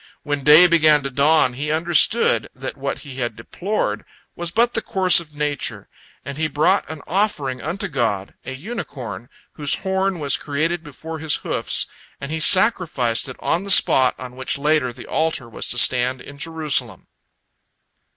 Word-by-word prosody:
When 145 Hz, -1 st, -3 dB
day 150 Hz, +5 st, +8 dB
began 155 Hz, -4 st, +4 dB
to 140 Hz, -, -4 dB
dawn, 140 Hz, -1 st, +3 dB
he 145 Hz, +4 st, -4 dB
understood 160 Hz, -, +2 dB
that 130 Hz, 0 st, -6 dB
what 135 Hz, 0 st, -4 dB
he 135 Hz, -2 st, -10 dB
had 120 Hz, -4 st, -3 dB
deplored 190 Hz, -, -3 dB, 0.3 s
was 175 Hz, -1 st, -4 dB
but 235 Hz, +6 st, +1 dB
the 225 Hz, -, -1 dB
course 185 Hz, -4 st, +3 dB
of 155 Hz, -3 st, -12 dB
nature, 145 Hz, -2 st, -3 dB, 0.4 s
and 140 Hz, +1 st, -7 dB
he 160 Hz, -, +1 dB
brought 160 Hz, +6 st, +1 dB
an 160 Hz, -2 st, -8 dB
offering 150 Hz, -, -1 dB
unto 190 Hz, +6 st, -3 dB
God, 115 Hz, -, -2 dB
a 135 Hz, -, -6 dB
unicorn 130 Hz, -, -7 dB, 0.2 s
whose 145 Hz, -2 st, 0 dB
horn 190 Hz, -1 st, -1 dB
was 145 Hz, -4 st, 0 dB
created 160 Hz, +4 st, -2 dB
before 160 Hz, +2 st, -9 dB
his 155 Hz, -2 st, 0 dB
hoofs, -, -, +1 dB, 0.3 s
and 140 Hz, +2 st, -7 dB
he 160 Hz, -, -2 dB
sacrificed 160 Hz, -, +3 dB
it 130 Hz, -, -8 dB
on 175 Hz, -, -1 dB
the 200 Hz, -, -7 dB
spot 130 Hz, -8 st, +5 dB
on 125 Hz, -1 st, -9 dB
which 130 Hz, +1 st, -3 dB
later 145 Hz, -3 st, +1 dB
the 120 Hz, 0 st, -11 dB
altar 160 Hz, -6 st, -1 dB
was 115 Hz, -, -4 dB
to 120 Hz, -, -2 dB
stand 125 Hz, +1 st, +4 dB
in 140 Hz, +2 st, -12 dB
Jerusalem. 160 Hz, -2 st, -1 dB
150 Hz, 170 wpm, -20 LUFS, 130-170 Hz, 0.4 s, day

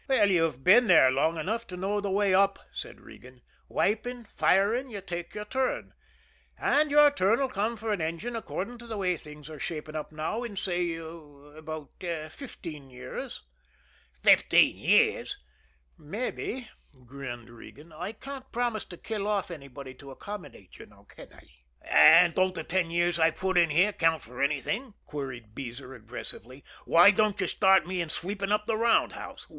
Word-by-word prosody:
"You've 170 Hz, -, +2 dB
been 220 Hz, +6 st, +6 dB
here 155 Hz, -7 st, +7 dB
long 160 Hz, +5 st, +1 dB
enough 220 Hz, +9 st, -3 dB
to 180 Hz, -, -8 dB
know 200 Hz, +3 st, -1 dB
the 200 Hz, -, -3 dB
way 200 Hz, 0 st, +2 dB
up," 195 Hz, +1 st, +4 dB
said -, -, -8 dB
Regan. 125 Hz, 0 st, -15 dB, 0.3 s
"Wiping, 240 Hz, +4 st, -1 dB
firing 220 Hz, +8 st, +2 dB
you 210 Hz, -4 st, -6 dB
take 175 Hz, -3 st, -6 dB
your 210 Hz, 0 st, -5 dB
turn. 260 Hz, +4 st, -2 dB, 0.7 s
And 300 Hz, +1 st, +2 dB
your 295 Hz, 0 st, +6 dB
turn'll 240 Hz, +1 st, +2 dB
come 220 Hz, +1 st, -2 dB
for 220 Hz, 0 st, -2 dB
an 190 Hz, -, -2 dB
engine 170 Hz, +10 st, -3 dB
according 230 Hz, +1 st, -5 dB
to 240 Hz, -, -11 dB
the 220 Hz, -2 st, -5 dB
way 185 Hz, -2 st, +1 dB
things 150 Hz, -2 st, -12 dB
are 155 Hz, -2 st, -9 dB
shaping 155 Hz, -1 st, -5 dB
up 155 Hz, 0 st, -5 dB
now 155 Hz, +9 st, -3 dB
in, 230 Hz, -5 st, -6 dB
say, 175 Hz, -3 st, -1 dB
about 155 Hz, -1 st, -10 dB, 0.4 s
fifteen 160 Hz, -, -9 dB
years." 130 Hz, 0 st, -7 dB, 0.8 s
"Fifteen -, -, +5 dB
years!" -, -, +2 dB, 0.6 s
"Mabbe," 240 Hz, -, -4 dB, 0.4 s
grinned 120 Hz, -2 st, -8 dB
Regan. 150 Hz, +7 st, -14 dB
"I 180 Hz, +6 st, -5 dB
can't 265 Hz, +3 st, -9 dB
promise 240 Hz, -3 st, -1 dB
to 175 Hz, -, -11 dB
kill 210 Hz, 0 st, -4 dB
off 200 Hz, -4 st, -1 dB
anybody 140 Hz, -4 st, -9 dB
to 140 Hz, +2 st, -13 dB
accommodate 135 Hz, -, -10 dB
you, -, -, -11 dB, 0.2 s
can -, -, -14 dB
I?" -, -, -17 dB, 0.4 s
"And 170 Hz, +1 st, +7 dB
don't 185 Hz, +1 st, +1 dB
the 165 Hz, -, -4 dB
ten 180 Hz, 0 st, 0 dB
years 175 Hz, 0 st, +1 dB
I've 160 Hz, 0 st, +3 dB
put 190 Hz, 0 st, -1 dB
in 170 Hz, -2 st, +5 dB
here 185 Hz, +7 st, +3 dB
count 165 Hz, -4 st, +1 dB
for 125 Hz, +4 st, -8 dB
anything?" 200 Hz, -, -1 dB
queried 130 Hz, -7 st, -7 dB
Beezer 125 Hz, +1 st, -8 dB
aggressively. 125 Hz, +2 st, -7 dB, 0.2 s
"Why 175 Hz, +4 st, +7 dB
don't 210 Hz, 0 st, +1 dB
you 190 Hz, -, +1 dB
start 190 Hz, +1 st, +4 dB
me 180 Hz, 0 st, -2 dB
in 170 Hz, -, -4 dB
sweeping 195 Hz, +5 st, -3 dB
up 210 Hz, 0 st, +1 dB
the 225 Hz, -1 st, 0 dB
round 230 Hz, 0 st, +3 dB
house? -, -, -9 dB
180 Hz, 165 wpm, -28 LUFS, 150-210 Hz, 0.8 s, here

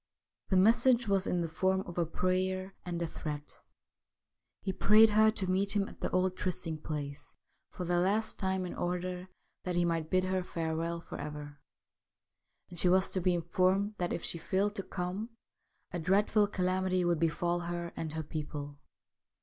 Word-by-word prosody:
The 190 Hz, -, +3 dB
message 235 Hz, +4 st, +5 dB
was 195 Hz, -1 st, +1 dB
in 175 Hz, -, +1 dB
the 170 Hz, -, -1 dB
form 190 Hz, +4 st, +1 dB
of 175 Hz, -3 st, -8 dB
a 170 Hz, -, +1 dB
prayer 185 Hz, +2 st, -1 dB
and 175 Hz, -2 st, -3 dB
a -, -, 0 dB
threat. 150 Hz, -2 st, -6 dB, 1.0 s
He 190 Hz, -, -1 dB
prayed 215 Hz, +4 st, +6 dB
her 215 Hz, +1 st, +5 dB
to 195 Hz, -, -1 dB
meet 195 Hz, +2 st, +1 dB
him 200 Hz, -1 st, +2 dB
at -, -, -13 dB
the -, -, -1 dB
old 185 Hz, 0 st, +1 dB
trysting 165 Hz, -4 st, -3 dB
place 145 Hz, -2 st, -5 dB, 0.3 s
for 180 Hz, -, -6 dB
the 175 Hz, 0 st, +2 dB
last 205 Hz, +5 st, +1 dB
time 190 Hz, -1 st, 0 dB
in 180 Hz, -, -5 dB
order 180 Hz, +1 st, -3 dB, 0.4 s
that 180 Hz, -1 st, -2 dB
he 175 Hz, 0 st, +3 dB
might 165 Hz, -2 st, -1 dB
bid 185 Hz, 0 st, +3 dB
her 185 Hz, 0 st, 0 dB
farewell 165 Hz, -1 st, -2 dB
for -, -, -8 dB
ever, 145 Hz, 0 st, -7 dB, 1.1 s
and 175 Hz, -, -2 dB
she 180 Hz, -, +4 dB
was 190 Hz, +1 st, +3 dB
to 185 Hz, -, 0 dB
be 180 Hz, 0 st, +2 dB
informed 185 Hz, +4 st, +1 dB
that 175 Hz, -1 st, -1 dB
if 170 Hz, -, -3 dB
she 170 Hz, -, -2 dB
failed 195 Hz, +4 st, 0 dB
to -, -, 0 dB
come 185 Hz, +4 st, -4 dB, 0.6 s
a 175 Hz, -, -3 dB
dreadful 205 Hz, +4 st, +3 dB
calamity 185 Hz, -1 st, 0 dB
would 170 Hz, -2 st, +2 dB
befall 170 Hz, +2 st, +1 dB
her 170 Hz, 0 st, -4 dB
and 160 Hz, -2 st, -4 dB
her 160 Hz, 0 st, -3 dB
people. 145 Hz, -1 st, -6 dB
180 Hz, 180 wpm, -32 LUFS, 170-190 Hz, 1.1 s, prayed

